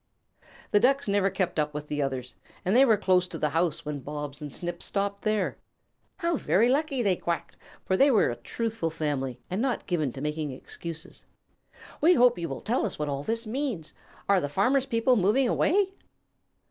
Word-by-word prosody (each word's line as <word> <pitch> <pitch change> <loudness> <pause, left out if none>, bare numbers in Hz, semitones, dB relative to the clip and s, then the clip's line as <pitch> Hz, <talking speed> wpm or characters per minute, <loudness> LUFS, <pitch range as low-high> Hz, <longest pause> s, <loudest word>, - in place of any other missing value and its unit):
The 205 - +5
Ducks 275 +3 +3
never 200 -1 +2
kept 185 -3 -1
up 150 0 -1
with 150 0 -5
the 150 0 -2
others, 130 -2 -3 0.3
and 190 +4 +2
they 265 +2 +7
were 225 -5 +4
close 185 -2 +2
to 175 -2 -6
the 150 -1 0
house 165 0 0
when 150 -1 -3
Bobs 145 +1 -6
and 145 -1 -6
Snip 175 +2 -5
stopped 200 0 -2
there. 215 -1 0 0.6
"How 340 -3 0
very 230 +1 +3
lucky!" 275 -2 +1
they 195 -3 +3
quacked, 170 -1 -3 0.3
for 190 - +1
they 275 +9 +5
were 225 - +4
a - - -4
truthful 225 - -3
family 145 -6 -2
and 185 +4 -2
not 260 -1 -1
given 155 -7 0
to - - -7
making 150 0 -3
excuses. 165 +6 -8 0.8
"We 350 +3 +6
hope 245 -4 +5
you 165 -1 -3
will 135 - -5
tell 240 +4 0
us 215 - -2
what 150 -1 -2
all 140 -1 -2
this 230 +9 -2
means. 225 - -3 0.3
Are 200 -2 +4
the 145 - -2
Farmer's 255 - +2
people 240 0 +3
moving 215 +7 +3
away?" 385 +9 +2
185 Hz, 195 wpm, -27 LUFS, 150-235 Hz, 0.8 s, they